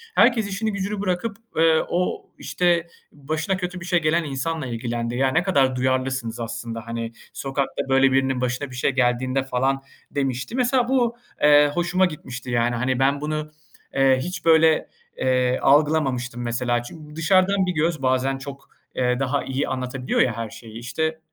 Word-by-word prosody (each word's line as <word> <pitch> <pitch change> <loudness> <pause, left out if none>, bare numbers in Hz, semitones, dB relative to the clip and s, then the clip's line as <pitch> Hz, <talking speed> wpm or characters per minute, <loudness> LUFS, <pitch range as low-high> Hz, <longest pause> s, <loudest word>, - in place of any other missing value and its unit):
herkes 230 -3 +4
işini 215 +2 -2
gücünü 200 +1 -3
bırakıp, 200 +3 -2 0.2
eee, 160 0 +5
o, 180 +1 -1
işte, 170 -1 +1 0.2
başına 155 +6 -2
kötü 180 0 -4
bir 170 - -8
şey 175 -2 +2
gelen 160 +2 +2
insanla 145 +2 -3
ilgilendi. 120 0 -3
"Ya, 135 +2 +2
ne 160 +5 +2
kadar 140 -9 +2
duyarlısınız 130 -2 -1
aslında, 115 0 -5
hani, 115 0 -4 0.2
sokakta 135 0 -3
böyle 135 0 +4
birinin 130 -1 +1
başına 125 +3 -2
bir 125 - -10
şey 130 - +1
geldiğinde 130 +1 +1
falan." 135 +1 0 0.3
demişti. 135 - -2
Mesela, 250 -1 +2
bu, 245 -3 +2 0.3
eee, 145 0 +6
hoşuma 175 +2 +2
gitmişti, 130 -7 -6
yani, 120 0 +1
hani, 130 +2 0
ben 140 +1 +2
bunu, 155 0 -3 0.4
eee, 135 -1 +4
hiç 180 +3 -5
böyle, 160 -1 +4 0.3
eee, 125 -1 +1
algılamamıştım, 135 -4 +2
mesela. 120 0 -1
Çünkü 150 +4 -11
dışarıdan 185 +4 +3
bir 180 - -1
göz 160 -1 0
bazen 130 +1 +1
çok, 135 0 -10 0.3
eee, 125 0 +1
daha 135 +1 0
iyi 135 +1 -2
anlatabiliyor 130 0 -1
ya 115 -3 +1
her 115 -2 -4
şeyi. 115 0 -10
İşte, 160 +7 -2
135 Hz, 165 wpm, -23 LUFS, 125-165 Hz, 0.4 s, eee